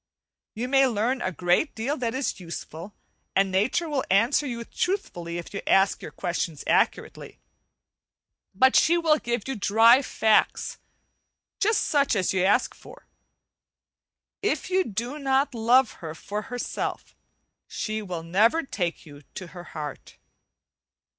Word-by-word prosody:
You 235 +3 -3
may 270 0 +4
learn 245 +2 -1
a 185 - -1
great 180 - +1
deal 245 +7 -2
that 240 -1 -2
is 265 -5 -2
useful, 170 +2 -8 0.4
and 195 0 +2
nature 215 - +1
will 290 -4 -1
answer 230 +9 +3
you 235 -2 -4
truthfully 200 - -3
if 175 - -8
you 200 - -4
ask 195 +1 +3
you - - -7
questions 170 -4 -3
accurately, - - 0 1.2
but 260 +6 +4
she 340 +2 +5
will 315 -3 +3
give 240 -1 -3
you 270 - -3
dry 225 +5 +5
facts, 220 -5 +1 0.8
just 430 +1 +2
such 285 -5 +2
as 190 -2 0
you 185 -1 +1
ask 205 +6 +2
for. - - -15 1.4
If 415 -2 -1
you 375 +1 +3
do 240 - -4
not 275 0 +1
love 240 +2 +3
her 160 -2 -6
for 205 +5 -5
herself 245 0 -4 0.5
she 215 0 -4
will 180 -5 -5
never 215 - +2
take 175 -11 -4
you 145 -2 -13
to 185 - -7
her 175 -1 -9
heart. 150 -3 -8
225 Hz, 140 wpm, -25 LUFS, 185-270 Hz, 1.4 s, she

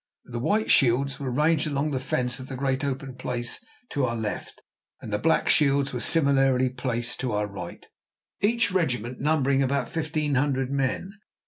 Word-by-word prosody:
The 120 -1 -5
"White 210 - +1
Shields" 135 +1 +3
were 135 -2 -3
ranged 150 +4 +2
along 145 +1 -1
the 135 - -1
fence 125 -1 -1
of 130 - -8
the 135 - -6
great 135 +1 -1
open 135 -1 -3
place 125 - -3 0.3
to 140 - -1
our 120 -2 -1
left, 110 -2 -4 0.4
and 105 - -7
the 105 - +1
"Black 160 +6 +2
Shields" 140 -2 +3
were 125 - -2
similarly 135 -3 +3
placed 125 -2 -2
to 125 -4 -2
our 105 0 +1
right, 95 -4 -8 0.6
each 225 0 +2
regiment 125 - -1
numbering 140 -2 +2
about 140 +1 0
fifteen 155 -2 -1
hundred 135 -1 +1
men. 140 +7 -1
135 Hz, 175 wpm, -26 LUFS, 125-145 Hz, 0.6 s, Shields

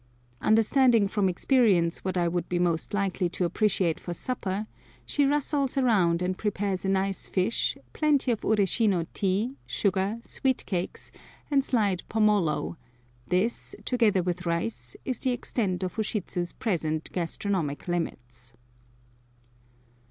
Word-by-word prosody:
Understanding 225 0 +4
from 195 -1 +1
experience 185 -4 +3
what 185 -1 -2
I 175 -1 +2
would 175 0 -2
be 180 - 0
most 175 -2 0
likely 195 -3 0
to 180 - -1
appreciate 185 -3 +1
for 175 - -5
supper, 205 -4 -3 0.4
she 285 - +1
rustles 285 -1 0
around 185 -10 +3
and 185 +1 0
prepares 200 -2 -2
a 195 - 0
nice 195 0 0
fish, 190 +4 0 0.2
plenty 290 -4 +2
of 225 - -1
Ureshino 200 -3 +2
tea, 205 +7 0
sugar, 195 +2 0
sweet 260 0 -1
cakes, 180 -2 -3 0.4
and 275 -1 +4
sliced 205 -9 0
pomolo; 210 -8 +1 0.5
this, 195 +6 -1
together 215 -7 +2
with 180 0 -3
rice, 125 -8 -2
is 255 -3 -2
the 260 - 0
extent 200 -6 -2
of 185 +4 -4
Ushidzu's 185 -5 -2
present 160 -7 -2
gastronomic 170 -3 -2
limits. 125 -8 -4
195 Hz, 130 wpm, -27 LUFS, 175-225 Hz, 0.5 s, Understanding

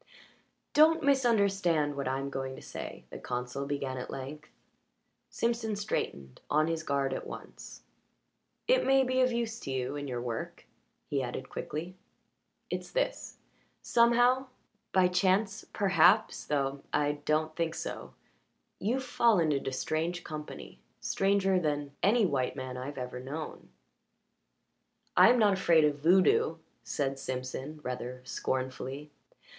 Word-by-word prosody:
"Don't 320 +2 +5
misunderstand 200 - +2
what 140 -2 -3
I'm 135 +1 -2
going 135 -1 -4
to - - -11
say," - - -7
the - - -7
consul 125 +3 -4
began 140 -2 -3
at 125 - -6
length. 140 +3 -7 0.8
Simpson 230 -2 -1
straightened, 70 - -3
on 155 +1 +3
his 165 0 -1
guard 140 -3 0
at - - -5
once. - - -10 0.8
"It - - +4
may 270 0 +4
be 255 0 +1
of 255 0 +3
use 235 -1 -2
to 135 - -6
you 130 +1 -2
in 145 0 -4
your 125 -2 -3
work," 120 -2 -5 0.4
he 140 -2 -1
added 130 +1 -5
quickly. 165 +4 -5 0.8
"It's - - -3
this. - - -2 0.5
Somehow 245 +2 +4 0.4
by 185 -1 +5
chance 190 +3 +1
perhaps, 190 -5 +3
though 140 -1 -1
I 145 0 +1
don't 155 +1 0
think 165 -1 -1
so - - -6 0.6
you've 245 +7 0
fallen 220 -10 +3
into 135 -1 -1
strange 165 +6 -2
company 150 -1 -8 0.2
stranger 195 -1 +2
than 145 -3 -1
any 215 +3 +4
white 135 -7 0
man 130 -1 -5
I've 130 +3 -6
ever 125 -1 -5
known." 145 +5 -7 1.5
"I - - +8
am 245 - +5
not 210 -4 +5
afraid 170 -4 +4
of 145 -1 0
voodoo," 190 - +4 0.3
said 135 -1 -2
Simpson 130 +4 -5
rather 125 0 -5
scornfully. 130 +3 -3
155 Hz, 135 wpm, -30 LUFS, 135-205 Hz, 1.5 s, I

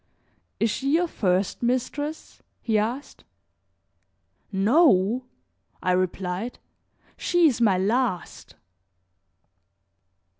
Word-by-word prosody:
"Is 225 - +2
she 275 +6 0
your 350 +2 +2
first 190 - -1
mistress?" 260 +5 -3 0.2
he 225 - -2
asked. 240 +7 -4 1.3
"No!" 220 - +3 0.6
I 185 - +2
replied, 185 +4 -2 0.6
"she 350 -1 +2
is 250 -5 0
my 205 -5 +4
last." 210 0 -2
230 Hz, 80 wpm, -25 LUFS, 190-270 Hz, 1.3 s, my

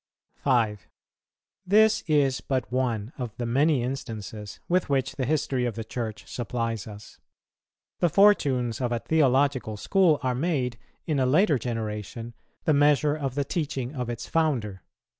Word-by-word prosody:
5. 110 - +1 0.8
This 220 +3 +4
is 140 -4 +2
but 130 -5 -2
one 120 -3 -1
out 120 -4 -4
of 120 - -2
many 140 +2 +2
instances 110 -5 -6
with 180 -2 +1
which 135 -1 0
the 130 - -2
history 135 -4 0
of 120 -3 -2
the 115 - -4
Church 110 -1 -5
supplies 115 -3 -3
us. 105 -1 -11 0.8
The 175 - +3
fortunes 135 - +3
of 120 -1 -1
a 120 - +1
theological 135 -5 +1
school 170 - +3
are 130 -1 +1
made, 125 -5 -1 0.3
in 150 -4 0
a 130 - +2
later 150 0 +3
generation, 115 0 -5 0.3
the 155 - +3
measure 145 0 +3
of 135 -4 -3
the 140 -1 0
teaching 140 -5 -3
of 125 -4 -4
its 120 -1 -5
founder. 125 - 0
130 Hz, 150 wpm, -26 LUFS, 115-150 Hz, 0.8 s, This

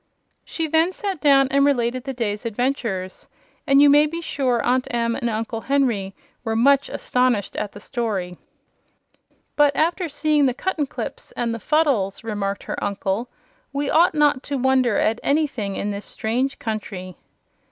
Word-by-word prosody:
She 325 -1 -3
then 320 +3 +2
sat 385 -4 -4
down 275 -2 +5
and 280 0 +4
related 255 -2 +1
the 270 - -3
day's 215 -3 -3
adventures, 230 -5 -3 0.4
and 275 0 +5
you - - +7
may 295 +1 +6
be 335 +3 -5
sure 265 -7 0
Aunt 255 +1 +1
Em 230 -1 0
and 235 - -2
Uncle 225 0 -3
Henry 235 -9 0 0.3
were 225 -1 -2
much 275 +4 +4
astonished 250 -5 0
at 210 -1 -3
the 205 - -10
story. 205 -7 -3 1.2
"But 290 -1 +4
after 340 +2 0
seeing 295 -1 +2
the 250 - -1
Cuttenclips 300 -3 -4
and 235 -1 0
the 230 - -5
Fuddles," 270 -11 +1
remarked 205 -3 -3
her - - -5
uncle, 200 +4 -2 0.4
"we 280 +1 -2
ought 335 +1 +4
not 295 -3 +3
to 285 - -4
wonder 255 -3 +2
at 225 +2 +1
anything 275 -10 0
in 205 - -2
this 200 0 -6
strange 250 +5 -2
country." 200 -5 -5
250 Hz, 160 wpm, -22 LUFS, 215-285 Hz, 1.2 s, you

